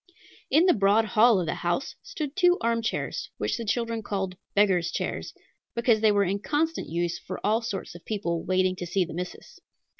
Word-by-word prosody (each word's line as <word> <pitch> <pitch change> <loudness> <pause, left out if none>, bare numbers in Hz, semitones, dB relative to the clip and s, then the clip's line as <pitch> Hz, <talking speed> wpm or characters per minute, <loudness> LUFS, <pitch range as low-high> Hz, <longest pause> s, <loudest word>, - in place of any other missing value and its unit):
In 315 +6 +5
the 365 - +6
broad 205 +2 +3
hall 220 0 +5
of 175 - -1
the 160 - -1
house 175 +8 -2
stood 310 - -5
two 355 -1 +4
armchairs, 230 -1 -1
which - - -1
the 235 - -4
children 230 +1 -1
called 195 -3 -3 0.2
"beggars' 190 -4 +3
chairs," - - -3 0.4
because 235 -2 +3
they 220 -1 +5
were 205 -1 +3
in 195 +2 -1
constant 315 +8 -1
use 170 +1 -1
for - - -7
all 220 +2 +2
sorts 205 -4 -5
of 175 - -12
people, 170 -6 -2
"waiting 185 0 +1
to 175 - -5
see 185 +1 +1
the 165 - -9
missus." 180 +2 -7
205 Hz, 190 wpm, -27 LUFS, 180-235 Hz, 0.4 s, the